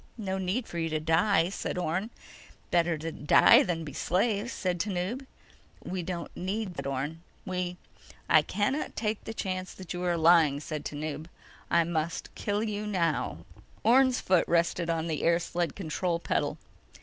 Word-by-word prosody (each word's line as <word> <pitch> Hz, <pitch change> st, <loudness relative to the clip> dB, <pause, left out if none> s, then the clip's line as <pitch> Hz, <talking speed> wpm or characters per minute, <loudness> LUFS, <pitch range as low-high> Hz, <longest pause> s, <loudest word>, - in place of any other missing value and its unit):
"No 190 Hz, -3 st, -2 dB
need 190 Hz, +6 st, -1 dB
for 170 Hz, -, -5 dB
you 165 Hz, 0 st, -1 dB
to 155 Hz, 0 st, -1 dB
die," 165 Hz, +3 st, +3 dB
said 190 Hz, -, -4 dB
Orne. 180 Hz, +5 st, -1 dB, 0.6 s
"Better 170 Hz, -1 st, +2 dB
to 160 Hz, +2 st, -4 dB
die 150 Hz, -, +6 dB
than 165 Hz, -3 st, -1 dB
be 145 Hz, -3 st, -7 dB
slaves," 205 Hz, -, 0 dB
said 180 Hz, -5 st, -2 dB
Tanub. 205 Hz, +8 st, -2 dB, 0.6 s
"We 185 Hz, 0 st, -3 dB
don't 170 Hz, 0 st, -5 dB
need 200 Hz, +3 st, -2 dB
slaves," 180 Hz, -, -10 dB
said 140 Hz, 0 st, -3 dB
Orne. 140 Hz, +4 st, -3 dB, 0.2 s
"We—" 180 Hz, -2 st, -3 dB, 0.5 s
"I -, -, +6 dB
cannot 240 Hz, +9 st, -1 dB
take 215 Hz, -1 st, -2 dB
the 225 Hz, -, -5 dB
chance 185 Hz, -2 st, -3 dB
that 185 Hz, -2 st, -7 dB
you 175 Hz, -, -4 dB
are 175 Hz, -1 st, +1 dB
lying," 160 Hz, -3 st, +5 dB
said 150 Hz, 0 st, -5 dB
Tanub. 155 Hz, +1 st, -4 dB, 0.4 s
"I 170 Hz, 0 st, +4 dB
must 165 Hz, 0 st, -3 dB
kill 205 Hz, +1 st, -1 dB
you 210 Hz, -1 st, -3 dB
now." 170 Hz, -6 st, -1 dB, 0.4 s
Orne's 255 Hz, +2 st, +5 dB
foot 185 Hz, -2 st, +2 dB
rested 170 Hz, 0 st, +1 dB
on 165 Hz, -1 st, 0 dB
the 160 Hz, -3 st, -2 dB
air 170 Hz, 0 st, +4 dB
sled 175 Hz, 0 st, -2 dB
control 175 Hz, -1 st, -1 dB
pedal. 170 Hz, -, -1 dB
175 Hz, 170 wpm, -29 LUFS, 165-200 Hz, 0.6 s, die